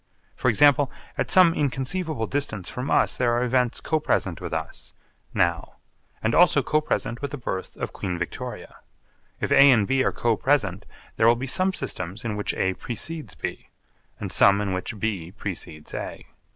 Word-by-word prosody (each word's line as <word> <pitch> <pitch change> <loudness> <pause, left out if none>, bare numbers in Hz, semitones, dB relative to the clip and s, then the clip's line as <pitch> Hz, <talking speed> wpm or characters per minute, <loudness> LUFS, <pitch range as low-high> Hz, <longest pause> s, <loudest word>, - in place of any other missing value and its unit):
For 125 - +1
example, 145 +2 +4 0.2
at - - -2
some 180 -3 +6
inconceivable 145 0 -1
distance 110 -7 -2
from 125 +3 -4
us - - +3
there 120 -2 +1
are 120 +1 +1
events 125 -1 +1
co 155 - 0
present 95 - -1
with 85 - -5
us 80 -1 -5 0.4
now 85 -1 0 0.5
and 110 +1 +1
also 165 -6 +5
co 155 +4 +1
present 120 -5 -2
with 140 - -3
the 145 - -6
birth 95 -7 -5
of - - -5
Queen 90 -3 -3
Victoria. 90 - -6 0.6
If - - -2
A 140 +1 +8
and 115 -6 +5
B 135 0 +2
are - - +1
co 115 -2 +1
present 105 -8 0 0.3
there 110 - +4
will 120 - +6
be 125 +3 -4
some 185 +8 +2
systems 95 - -5
in 110 -2 -2
which 105 - -2
A 95 0 0
precedes 120 - -5
B - - -6 0.5
and - - -5
some 100 0 +5
in 100 -2 -1
which 95 +4 -4
B 95 -5 -3
precedes 85 -7 -6
A. - - -6
120 Hz, 180 wpm, -24 LUFS, 95-140 Hz, 0.6 s, A